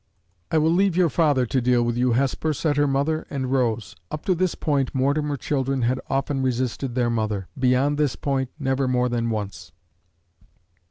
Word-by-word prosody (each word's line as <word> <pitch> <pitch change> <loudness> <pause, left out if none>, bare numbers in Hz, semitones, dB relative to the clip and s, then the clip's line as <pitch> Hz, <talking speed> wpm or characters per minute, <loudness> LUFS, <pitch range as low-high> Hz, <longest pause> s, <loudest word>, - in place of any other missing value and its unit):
"I - - +1
will 155 +1 +3
leave 185 0 +2
your 175 -4 +3
father 145 -6 +2
to 130 +2 0
deal 120 0 +3
with 120 0 -1
you, 125 0 +2
Hesper," 140 +4 0
said 150 +1 0
her 145 0 +3
mother, 145 +4 0
and 130 -3 -3
rose. 120 -5 0
Up 155 - -6
to 190 - +3
this 180 0 0
point, 140 -4 -1
Mortimer 145 +2 +1
children 135 -1 -1
had 125 +2 0
often 135 0 -1
resisted 130 0 -2
their 120 -2 +1
mother; 110 -4 -2
beyond 130 +3 +2
this 145 -3 +1
point, 135 -2 -1
never 135 -2 0
more 125 -1 +1
than 115 -1 -1
once. 105 -3 -5
135 Hz, 180 wpm, -23 LUFS, 125-145 Hz, -, will